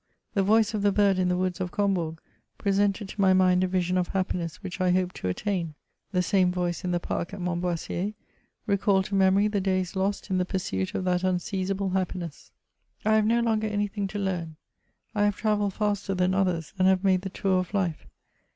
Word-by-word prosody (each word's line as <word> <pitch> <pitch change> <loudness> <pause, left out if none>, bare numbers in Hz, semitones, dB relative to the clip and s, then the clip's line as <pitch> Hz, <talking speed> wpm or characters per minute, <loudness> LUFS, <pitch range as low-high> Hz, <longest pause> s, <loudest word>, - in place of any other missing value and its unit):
The 200 - +2
voice 220 +3 +3
of 210 - -1
the 205 0 +3
bird 200 -2 +3
in 180 -1 +2
the 180 - +1
woods 185 0 -1
of 180 - -1
Combourg, 175 -5 0 0.4
presented 200 0 +1
to 205 - -4
my 190 -1 +5
mind 185 -1 +4
a - - +2
vision 185 0 0
of 180 - 0
happiness 180 -2 -3
which 185 0 -5
I 185 - +3
hoped 180 0 +1
to - - -3
attain; 170 - -2 0.4
the 180 -2 +1
same 185 -2 +3
voice 180 0 -2
in 180 - -2
the 175 -1 +1
park 175 +2 -3
at - - -9
Montboissier, 175 +2 -2 0.5
recalled 195 -1 +2
to 200 - -7
memory 195 +1 +4
the 205 -2 0
days 185 -1 -1
lost 195 +1 -1
in 185 - +2
the - - +2
pursuit 135 - -3
of - - -1
that 180 0 +1
unseizable 190 +1 -1
happiness. 180 -4 -3 0.5
I 215 - +4
have 215 -1 +4
no 235 +1 +3
longer 220 -2 +1
any 205 -1 0
thing 200 0 -3
to 205 - -6
learn; 180 -5 -2 0.6
I 205 -2 +2
have 205 -1 +1
travelled 210 -2 0
faster 205 -2 -1
than 180 0 +2
others, 180 -5 0
and 185 - +5
have 190 0 +3
made 190 -2 +3
the 190 - -5
tour 190 -1 +1
of 185 - -4
life. 185 -6 -1
190 Hz, 210 wpm, -27 LUFS, 180-200 Hz, 0.6 s, my